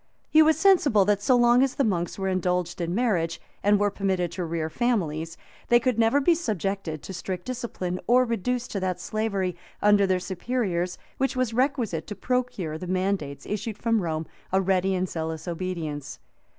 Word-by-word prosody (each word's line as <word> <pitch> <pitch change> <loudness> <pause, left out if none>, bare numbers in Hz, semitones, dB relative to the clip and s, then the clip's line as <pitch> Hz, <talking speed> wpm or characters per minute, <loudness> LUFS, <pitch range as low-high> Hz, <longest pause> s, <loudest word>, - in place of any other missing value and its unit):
He 310 - +7
was 315 0 +5
sensible 315 - +4
that 205 0 +2
so 250 +5 +4
long 240 0 +5
as 270 -1 +1
the 275 - +2
monks 175 -7 -1
were 190 -1 -2
indulged 180 -1 -1
in 170 +1 -1
marriage, 180 -9 0 0.2
and 205 0 +4
were 205 0 +2
permitted 190 -4 -1
to 175 +1 -4
rear 165 -1 -2
families, 165 -6 -1 0.3
they 240 - +6 0.2
never 225 +4 +3
could 285 - 0
be 345 - +6
subjected 195 - -3
to 190 - -7
strict 180 0 -5
discipline, 230 -8 -4
or 250 +1 +5
reduced 240 +2 -2
to 200 - -2
that 185 -1 -2
slavery, 200 -5 -2 0.2
under 205 -1 +4
their 185 -1 +2
superiors, 185 -2 -2 0.2
which 270 0 0
was 255 -3 0
requisite 245 - 0
to 205 - -5
procure 250 -11 -2
to 155 - -5
the 180 - -6
mandates, 185 -6 -1
issued 210 +1 -4
from 230 -2 +1
Rome, 160 -2 -2 0.3
a 190 - +3
ready 190 0 +1
and 185 0 0
zealous 160 0 -4
obedience. 165 -5 -4
195 Hz, 185 wpm, -26 LUFS, 175-235 Hz, 0.3 s, He